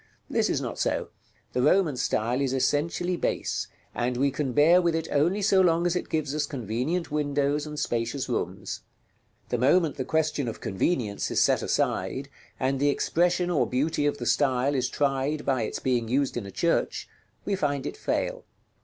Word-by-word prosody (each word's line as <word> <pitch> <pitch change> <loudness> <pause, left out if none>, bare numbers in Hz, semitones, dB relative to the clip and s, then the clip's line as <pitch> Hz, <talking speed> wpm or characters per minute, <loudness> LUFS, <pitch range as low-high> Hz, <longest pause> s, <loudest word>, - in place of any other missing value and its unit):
This - - +2
is - - +1
not - - -5
so; - - 0 0.4
the 125 - +1
Roman 170 0 +3
style 120 +1 0
is 135 -2 0
essentially 165 +6 0
base, - - -1 0.3
and 125 0 -1
we 140 +2 +2
can 140 -1 -2
bear 160 +8 +5
with 170 -2 +1
it 160 0 -2
only 175 +8 +2
so 195 -1 +5
long 170 -1 +3
as 175 0 +1
it 180 - -3
gives 150 -3 -1
us 150 -1 -1
convenient 135 - -2
windows 145 0 0
and 150 -1 -5
spacious 120 +2 -1
rooms; - - -3 0.7
the 125 - 0
moment 150 +4 +3
the 130 - -1
question 155 -2 0
of 115 - -5
convenience 105 - -1
is - - +1
set - - +3
aside, 135 +1 -1 0.3
and 135 +1 0
the 145 +1 +3
expression 175 +4 +1
or 160 - +2
beauty 145 +3 0
of 145 - 0
the 120 - -5
style 130 +2 +2
is 125 -3 0
tried 140 +1 0
by 130 -3 +1
its 110 - -2
being 120 -3 0
used 135 +3 0
in 115 -5 -4
a - - -8
church, 170 - 0 0.4
we 205 - -1
find 145 -7 -1
it - - -4
fail. - - -2
145 Hz, 185 wpm, -27 LUFS, 130-160 Hz, 0.7 s, bear